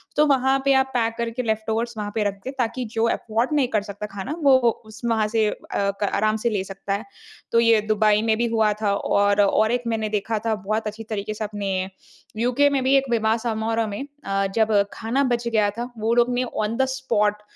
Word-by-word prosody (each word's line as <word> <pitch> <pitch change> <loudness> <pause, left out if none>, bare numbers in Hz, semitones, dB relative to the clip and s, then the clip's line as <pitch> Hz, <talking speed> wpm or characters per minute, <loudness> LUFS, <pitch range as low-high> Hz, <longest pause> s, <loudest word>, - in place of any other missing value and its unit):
तो 300 - +5
वहाँ 270 -2 +3
पे 275 - +5
आप 265 0 +4
पैक 230 -2 0
करके 235 +1 -2
लेफ़्टओवर्स 220 +1 -1
वहाँ 205 -1 -4
पे 220 - +1
रख 200 - -2
दें 265 - -4
ताकि 245 +1 -1
जो 225 0 +1
अफ़ॉर्ड 230 +3 -1
नहीं 285 -4 +2
कर 210 - +3
सकता 205 0 -7
खाना, 205 +10 -4
वो-वो 260 -4 +5 0.2
उस 220 +1 -13
वहाँ 225 -2 +1
से 220 0 +1
अ, - - -4 0.2
क 200 0 0
आराम 215 +1 +1
से - - +4
ले 205 -4 -1
सकता 195 +1 -5
है। 205 +3 -3 0.5
तो 230 - +4
ये 230 -2 +4
दुबई 215 0 +2
में 220 -1 +3
भी 235 - +1
हुआ 220 -2 +2
था 205 -2 +2
और 200 0 +2
और 215 +2 +3
एक 245 0 0
मैंने 220 -2 -1
देखा 215 +1 -1
था 225 -1 +1
बहुत 215 +2 -2
अच्छी 215 +2 -6
तरीके 215 -1 -4
से 215 - -5
अपने 205 -2 -3 0.7
यूके 250 +5 +3
में 275 -2 0
भी 265 +2 +3
एक 270 - +1
विवाह 225 -1 +2
समारोह 225 -1 -1
में 205 +5 -4 0.2
अ, 195 0 0
जब 220 -1 +2 0.2
खाना 235 +5 -1
बच 240 -2 0
गया 215 -3 +2
था, 240 +4 -6
वो 220 +1 0
लोग 240 +1 +3
ने 245 +1 +1
ऑन 225 -2 -3
द 265 - +3
स्पॉट 210 -5 0
220 Hz, 225 wpm, -23 LUFS, 210-240 Hz, 0.7 s, तो